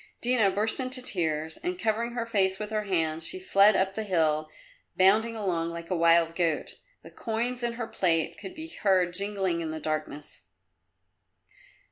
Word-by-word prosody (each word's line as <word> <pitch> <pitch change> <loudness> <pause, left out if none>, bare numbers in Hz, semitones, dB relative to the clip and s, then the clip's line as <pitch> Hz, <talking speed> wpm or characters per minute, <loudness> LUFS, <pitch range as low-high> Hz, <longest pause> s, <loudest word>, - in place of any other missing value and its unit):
Dina 240 -4 +2
burst 210 +5 -1
into 255 0 -1
tears 160 -9 -2
and, 360 +1 -4
covering 230 -2 -1
her 235 -1 -2
face 190 -4 +1
with 210 +1 -6
her 215 -1 -1
hands, 165 -4 0
she 370 - -3
fled 205 - +5
up 190 0 +1
the 220 - -3
hill, 155 -6 0 0.5
bounding 215 +5 +4
along 175 -6 -1
like 170 +1 -8
a - - +2
wild 165 0 +4
goat. 165 -4 -1 0.2
The - - -12
coins 235 +3 -3
in 240 -1 -1
her 235 0 -4
plait 170 -7 0
could 190 - -9
be 320 0 -7
heard 185 - +1
jingling 195 -3 0
in 160 - -3
the 160 0 -4
darkness. 155 -1 -4
190 Hz, 170 wpm, -27 LUFS, 165-225 Hz, 0.5 s, fled